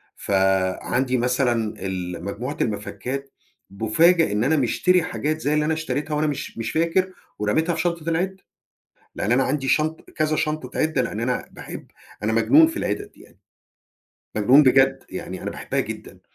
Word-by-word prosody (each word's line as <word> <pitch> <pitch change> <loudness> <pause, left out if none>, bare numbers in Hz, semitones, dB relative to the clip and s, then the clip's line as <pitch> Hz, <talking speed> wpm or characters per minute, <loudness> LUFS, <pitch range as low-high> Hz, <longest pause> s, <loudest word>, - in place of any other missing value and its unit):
فعَندي 95 +7 +1
مثلًا 120 -3 +1
ال 90 -2 -4
مجموعة 120 +9 -4
المَفَكّات، 125 +6 -3 0.4
بأُفاجأ 135 - +3
إن 105 +2 +1
أنا 155 +5 +2
مشتري 175 +7 +2
حاجات 155 -2 -2
زي 145 0 +1
اللي 150 0 +2
أنا 160 - +1
اشتريتها 155 -1 -2
وأنا 155 +1 +1
مش 140 -5 -4
مش 115 -1 -3
فاكر 170 +3 +1 0.3
ورميتها 160 +12 +1
في - - -1
شنطة 170 -2 -1
العِدّة. 190 +3 -2 0.7
لأن 110 - 0
أنا 130 +2 +3
عندي 135 -1 -1
شنط 155 +3 0
كذا 155 -1 0
شنطة 150 -5 -2
عِدّة، 155 -4 +1
لأن 115 -3 -4
أنا 125 +2 -2
باحب - - -9 0.4
أنا 110 +2 0
مجنون 285 - +6
في 330 - -7
العِدَد 410 0 -2
دي - - -22
يعني، - - -20 1.0
مجنون 125 +8 +6
بجد، 135 0 +4
يعني 95 0 -6
أنا - - -3
باحبها - - -3
جدًا - - -6
135 Hz, 160 wpm, -23 LUFS, 110-160 Hz, 1.0 s, مجنون